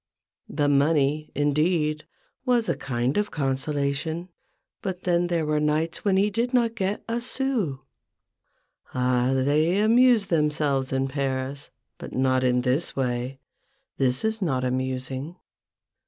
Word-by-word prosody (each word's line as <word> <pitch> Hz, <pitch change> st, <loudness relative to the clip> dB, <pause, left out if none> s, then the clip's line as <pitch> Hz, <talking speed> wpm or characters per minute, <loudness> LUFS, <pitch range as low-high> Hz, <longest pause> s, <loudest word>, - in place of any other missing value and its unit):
The 145 Hz, -1 st, 0 dB
money, 145 Hz, +1 st, +2 dB
indeed, 150 Hz, +1 st, +1 dB, 0.4 s
was 245 Hz, -3 st, +2 dB
a -, -, +1 dB
kind 125 Hz, +3 st, -1 dB
of 210 Hz, 0 st, +1 dB
consolation; 145 Hz, +4 st, -2 dB, 0.5 s
but 185 Hz, -2 st, -4 dB
then 175 Hz, -1 st, +2 dB
there 170 Hz, -2 st, 0 dB
were 150 Hz, 0 st, +1 dB
nights 150 Hz, +2 st, 0 dB
when 195 Hz, -2 st, +2 dB
he 205 Hz, +2 st, +2 dB
did 240 Hz, +5 st, 0 dB
not 235 Hz, -2 st, +2 dB
get 200 Hz, -2 st, -2 dB
a 230 Hz, +1 st, -2 dB
sou. 240 Hz, -, -1 dB, 1.1 s
Ah! 125 Hz, 0 st, +2 dB
they 150 Hz, +7 st, +2 dB
amuse 230 Hz, 0 st, +5 dB
themselves 150 Hz, -5 st, 0 dB
in 135 Hz, 0 st, 0 dB
Paris, 135 Hz, 0 st, -3 dB, 0.3 s
but -, -, -8 dB
not 130 Hz, 0 st, +2 dB
in 125 Hz, -1 st, +2 dB
this 130 Hz, +6 st, 0 dB
way 125 Hz, 0 st, -2 dB, 0.3 s
— -, -, -46 dB
this 130 Hz, +5 st, +1 dB
is 220 Hz, 0 st, -1 dB
not 135 Hz, -8 st, 0 dB
amusing. 130 Hz, +4 st, -3 dB
150 Hz, 135 wpm, -25 LUFS, 130-185 Hz, 1.1 s, amuse